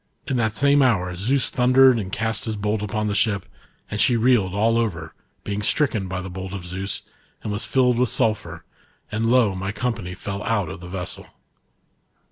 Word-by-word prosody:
In 135 - -1
that 110 -3 0
same 140 +3 +4
hour 90 -9 +2
Zeus 120 +10 0
thundered 130 0 +5
and 95 -3 -5
cast 110 +1 -1
his 110 -2 -3
b^lt 105 +1 -1
upon 105 +1 -2
the 105 - -1
ship, 100 -2 +1 0.5
and 105 - -1
she 125 -2 +4
reeled 115 -5 +3
all 115 +3 +2
over, 85 -9 -3 0.3
being 100 0 -3
stricken 110 -3 0
by 90 0 -4
the - - -6
bolt 95 +1 -6
of 90 -3 -7
Zeus, 95 +2 -4 0.4
and 105 - -3
was 105 +3 -2
filled 125 -2 +2
with 125 -2 +2
sulphur, 85 -7 -1 0.5
and 110 +2 0
lo, 120 -4 +4
my 95 +1 -3
company 105 -6 -3
lell 100 0 -3
out 105 -7 0
of - - -7
the 90 - -10
vessel. 90 -1 -6
105 Hz, 190 wpm, -23 LUFS, 95-120 Hz, 0.5 s, thundered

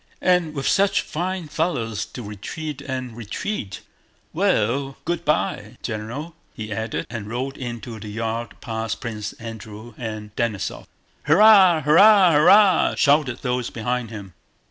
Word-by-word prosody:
"And 180 -4 +2
with 135 - -2
such 200 0 +3
fine 180 +1 -4
fellows 145 - -2
to 125 - -9
retreat 140 - -6
and 130 -4 -5
retreat! 115 - -5 0.5
Well, 135 +5 0
good 170 0 -2
by, 110 - -1
General," 125 +9 -5 0.2
he 110 -1 -5
added, 110 +2 -3
and 115 -3 -6
rode 130 +4 -3
into 120 -3 -6
the 105 - -8
yard 115 +2 -4
past 110 -1 -4
Prince 105 -4 -5
Andrew 110 0 -9
and 110 -3 -6
Denísov. 115 -5 -3 0.4
"Hurrah! 185 0 +6
hurrah! 185 +5 +6
hurrah!" 185 +6 +5
shouted 140 -4 +2
those 125 -2 -1
behind 120 +1 -3
him. 100 -5 -9
125 Hz, 130 wpm, -22 LUFS, 110-155 Hz, 0.5 s, Hurrah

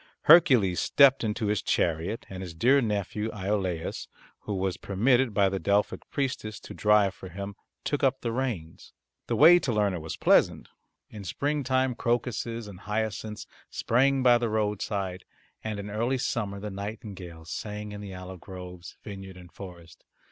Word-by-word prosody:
Hercules 130 - +6
stepped 135 -2 +5
into 110 0 -1
his 105 -1 +1
chariot 85 +6 0
and 95 -1 -7
his 90 -3 -7
dear 130 +11 +4
nephew 105 -1 -2
Iolaus, 95 -4 -2 0.3
who 105 - -4
was 95 -1 -1
permitted 120 +5 +2
by 100 -1 +3
the 95 0 -1
Delphic 100 +1 0
priestess 130 -7 -3
to - - -9
drive 105 -2 +3
for 95 - -10
him, 100 +3 -6 0.3
took 145 0 -1
up 135 0 +2
the 115 - -2
reins. 115 -11 -4 0.3
The - - 0
way 170 +4 +8
to 135 - -1
Lerna 100 -5 +1
was 80 0 -6
pleasant. - - +3 0.4
In 105 -2 -8
spring 145 - -1
time 130 0 +1
crocuses 120 -1 -2
and 95 -3 -10
hyacinths 105 0 -3 0.2
sprang 135 +3 +2
by 120 -1 +6
the 120 -1 -1
roadside, 105 -3 -2 0.4
and 110 -2 -3
in 100 0 -6
early 120 +5 0
summer 105 -5 -2
the 105 +1 -5
nightingales 95 -5 -7
sang 105 0 -5
in 105 0 -7
the 100 -2 -7
olive 90 0 -8
groves, 90 -1 -10
vineyard 95 -2 -8
and 90 -1 -13
forest. 85 -4 -11
105 Hz, 160 wpm, -28 LUFS, 95-120 Hz, 0.4 s, way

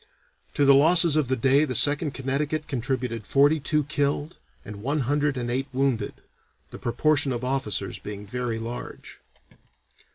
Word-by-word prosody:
To 145 - +2
the 140 - +7
losses 165 +3 +5
of 155 -4 +1
the 130 - 0
day 135 +4 +3
the 130 -5 -2
Second 145 +3 +3
Connecticut 145 +3 -2
contributed 120 -3 -3
forty 145 +3 +3
two 150 +2 0
killed 145 +2 -2 0.3
and 100 0 -9
one 140 +6 -1
hundred 145 +2 0
and 120 -1 -3
eight 135 +3 -2
wounded, 130 -5 -1 0.6
the - - -9
proportion 135 +3 +1
of 120 0 -4
officers 130 -6 -2
being 105 0 -8
very 120 +1 -3
large. 115 +2 -8
135 Hz, 155 wpm, -25 LUFS, 120-145 Hz, 0.6 s, the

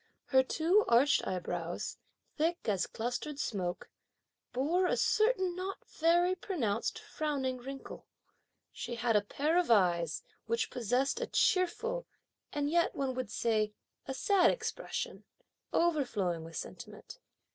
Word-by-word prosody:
Her 265 -1 +5
two 335 +10 +3
arched 255 +5 +4
eyebrows, 175 -2 -3 0.4
thick 330 0 0
as 200 -4 +1
clustered 245 +6 -3
smoke, 185 -10 -3 0.6
bore 320 +9 +2
a - - +1
certain 425 -5 +2
not 375 +2 -5
very 345 +3 +3
pronounced 295 - -1
frowning 295 -11 -2
wrinkle. 270 +2 -8 0.6
She 240 -1 -5
had 235 -1 +1
a 210 - +5
pair 300 - +1
of 355 - 0
eyes, 175 -7 +3 0.2
which 230 +1 0
possessed 250 +4 0
a - - -1
cheerful, 455 +6 +1 0.4
and 290 -1 -1
yet 340 +3 +2
one 270 -2 -1
would 255 -5 -3
say, 215 -1 +1 0.3
a 265 - -3
sad 385 +6 +4
expression, 445 -2 -3 0.5
overflowing 240 - +1
with 165 0 -10
sentiment. - - -8
270 Hz, 125 wpm, -32 LUFS, 225-345 Hz, 0.6 s, Her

